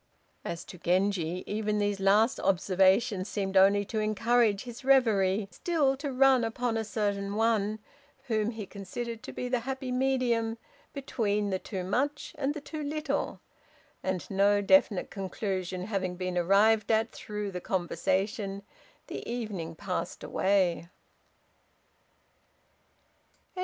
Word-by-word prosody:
As 170 Hz, -1 st, -5 dB
to 180 Hz, -, -11 dB
Genji, 180 Hz, -1 st, 0 dB
even 210 Hz, 0 st, -1 dB
these 205 Hz, -1 st, 0 dB
last 205 Hz, +5 st, +3 dB
observations 190 Hz, +2 st, +2 dB
seemed 195 Hz, -2 st, -3 dB
only 200 Hz, +2 st, +5 dB
to 220 Hz, -, -3 dB
encourage 215 Hz, 0 st, +2 dB
his 245 Hz, +1 st, -9 dB
reverie 215 Hz, -7 st, +3 dB
still 285 Hz, -, +1 dB
to 285 Hz, 0 st, -4 dB
run 260 Hz, -1 st, +5 dB
upon 230 Hz, +1 st, -1 dB
a 225 Hz, -, 0 dB
certain 205 Hz, -2 st, -2 dB
one, 215 Hz, -1 st, +1 dB, 0.5 s
whom 220 Hz, -4 st, 0 dB
he 220 Hz, -3 st, -6 dB
considered 220 Hz, +4 st, -6 dB
to -, -, -8 dB
be 250 Hz, -, -4 dB
the 250 Hz, 0 st, +1 dB
happy 260 Hz, +1 st, -4 dB
medium 250 Hz, -3 st, +1 dB, 0.3 s
between 210 Hz, -7 st, -1 dB
the 190 Hz, -, 0 dB
too 190 Hz, -2 st, -5 dB
much 275 Hz, +10 st, -1 dB
and 290 Hz, +1 st, 0 dB
the 300 Hz, -, -5 dB
too 310 Hz, +1 st, -6 dB
little; 300 Hz, +1 st, -2 dB, 0.6 s
and, 185 Hz, -2 st, -2 dB
no 200 Hz, +1 st, +4 dB
definite 205 Hz, -2 st, +3 dB
conclusion 190 Hz, -2 st, -3 dB
having 190 Hz, -3 st, -2 dB
been 185 Hz, 0 st, -3 dB
arrived 205 Hz, +5 st, +4 dB
at 220 Hz, +1 st, +2 dB
through 210 Hz, -1 st, -5 dB
the 180 Hz, -1 st, -5 dB
conversation, 195 Hz, +2 st, -1 dB, 0.4 s
the -, -, -6 dB
evening 200 Hz, -9 st, -4 dB
passed 185 Hz, +1 st, -4 dB
away. 185 Hz, -4 st, +1 dB
210 Hz, 130 wpm, -29 LUFS, 190-235 Hz, 0.6 s, only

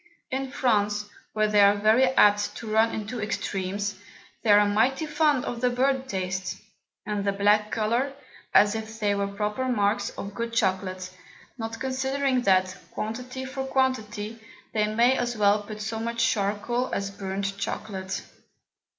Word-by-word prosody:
In 265 Hz, 0 st, -2 dB
France, 210 Hz, -5 st, +1 dB, 0.3 s
where 215 Hz, 0 st, +2 dB
they 210 Hz, -1 st, +4 dB
are 200 Hz, 0 st, +6 dB
very 215 Hz, +5 st, +4 dB
apt 205 Hz, -5 st, +4 dB
to -, -, -7 dB
run 220 Hz, +1 st, +3 dB
into 220 Hz, +2 st, -4 dB
Extremes, 205 Hz, -1 st, -3 dB, 0.4 s
they 225 Hz, -, -2 dB
are 205 Hz, 0 st, +7 dB
mighty 230 Hz, +9 st, +2 dB
fond 300 Hz, -3 st, +2 dB
of 240 Hz, -1 st, -4 dB
the 250 Hz, -, +3 dB
burnt 265 Hz, +1 st, 0 dB
Taste, 185 Hz, -2 st, -3 dB, 0.5 s
and 210 Hz, -1 st, -2 dB
the 200 Hz, -, +1 dB
black 205 Hz, +2 st, +3 dB
Colour, 235 Hz, +6 st, 0 dB, 0.4 s
as 205 Hz, 0 st, +5 dB
if 220 Hz, 0 st, -6 dB
they 205 Hz, -2 st, +2 dB
were 200 Hz, 0 st, 0 dB
proper 210 Hz, +5 st, -2 dB
Marks 205 Hz, -3 st, +1 dB
of 200 Hz, 0 st, -7 dB
good 230 Hz, +2 st, -4 dB
Chocolate, 185 Hz, -3 st, 0 dB, 0.5 s
not 225 Hz, 0 st, -5 dB
considering 265 Hz, 0 st, 0 dB
that, 185 Hz, -3 st, +3 dB
Quantity 250 Hz, +4 st, -5 dB
for 265 Hz, 0 st, -4 dB
Quantity, 235 Hz, -5 st, -1 dB, 0.3 s
they 210 Hz, -1 st, +2 dB
may 240 Hz, +4 st, +4 dB
as 240 Hz, -1 st, -1 dB
well 205 Hz, 0 st, +4 dB
put 210 Hz, +1 st, -8 dB
so 220 Hz, +1 st, -3 dB
much 230 Hz, +1 st, 0 dB
Charcoal 215 Hz, +5 st, -1 dB
as 200 Hz, 0 st, -2 dB
burnt 195 Hz, 0 st, -3 dB
Chocolate. 195 Hz, -2 st, -4 dB
215 Hz, 155 wpm, -26 LUFS, 205-245 Hz, 0.5 s, are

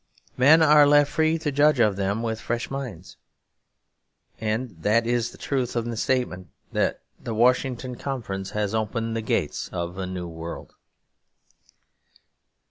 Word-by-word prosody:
Men 155 Hz, +5 st, +6 dB
are 150 Hz, -1 st, +7 dB
left 145 Hz, 0 st, +5 dB
free 160 Hz, +1 st, +2 dB
to 155 Hz, -2 st, -2 dB
judge 145 Hz, 0 st, +3 dB
of 105 Hz, -4 st, +3 dB
them 100 Hz, +3 st, -1 dB
with 115 Hz, -1 st, -3 dB
fresh 120 Hz, +1 st, -3 dB
minds. 125 Hz, -11 st, -7 dB, 1.2 s
And 110 Hz, -4 st, -3 dB
that 110 Hz, +5 st, +2 dB
is 120 Hz, 0 st, 0 dB
the -, -, -14 dB
truth 130 Hz, -4 st, -2 dB
in 120 Hz, 0 st, -1 dB
the -, -, -4 dB
statement 110 Hz, -7 st, -1 dB, 0.2 s
that -, -, 0 dB, 0.2 s
the 115 Hz, -, -5 dB
Washington 125 Hz, +2 st, +1 dB
Conference 105 Hz, -8 st, -4 dB
has 105 Hz, 0 st, -2 dB
opened 115 Hz, +1 st, -2 dB
the 115 Hz, -, -1 dB
gates 110 Hz, -, -2 dB
of 85 Hz, +1 st, -4 dB
a 95 Hz, -, -3 dB
new 90 Hz, -1 st, -5 dB
world. 80 Hz, 0 st, -8 dB
115 Hz, 145 wpm, -25 LUFS, 100-130 Hz, 1.2 s, are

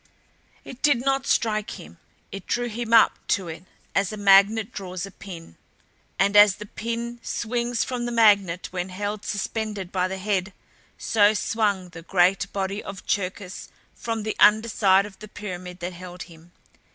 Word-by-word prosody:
It 260 Hz, -, -10 dB
did 290 Hz, -5 st, +4 dB
not 270 Hz, 0 st, +1 dB
strike 215 Hz, -2 st, 0 dB
him 80 Hz, +2 st, -13 dB, 0.3 s
it 195 Hz, -2 st, -8 dB
drew 240 Hz, 0 st, -1 dB
him 230 Hz, +1 st, -5 dB
up 230 Hz, -, +5 dB
to 190 Hz, -5 st, 0 dB
it 165 Hz, +2 st, -9 dB, 0.3 s
as 195 Hz, -1 st, +1 dB
a 215 Hz, -, -6 dB
magnet 200 Hz, +2 st, +5 dB
draws 185 Hz, -1 st, -5 dB
a 195 Hz, -, -11 dB
pin. 170 Hz, -, -11 dB, 0.6 s
And 200 Hz, +1 st, +2 dB
as 205 Hz, -2 st, +8 dB
the 210 Hz, -, -9 dB
pin 235 Hz, +3 st, -5 dB
swings 235 Hz, +1 st, -2 dB
from 250 Hz, -2 st, -3 dB
the -, -, -3 dB
magnet 200 Hz, -6 st, +3 dB
when 180 Hz, 0 st, -3 dB
held 205 Hz, +2 st, -4 dB
suspended 210 Hz, -2 st, -3 dB
by 185 Hz, -1 st, 0 dB
the 190 Hz, +1 st, -5 dB
head, 190 Hz, 0 st, -1 dB, 0.4 s
so 210 Hz, -1 st, +3 dB
swung 205 Hz, -4 st, 0 dB
the 165 Hz, -1 st, -10 dB
great 180 Hz, +2 st, +2 dB
body 195 Hz, +1 st, -3 dB
of 195 Hz, -1 st, -9 dB
Cherkis 185 Hz, -1 st, -3 dB, 0.2 s
from 225 Hz, -2 st, -4 dB
the 215 Hz, -, -3 dB
under 220 Hz, +2 st, +5 dB
side 195 Hz, -2 st, +4 dB
of 205 Hz, -2 st, -12 dB
the 215 Hz, -, -10 dB
pyramid 180 Hz, -4 st, -8 dB
that 175 Hz, +1 st, -4 dB
held 180 Hz, 0 st, -9 dB
him. 170 Hz, 0 st, -17 dB
200 Hz, 170 wpm, -24 LUFS, 185-220 Hz, 0.6 s, as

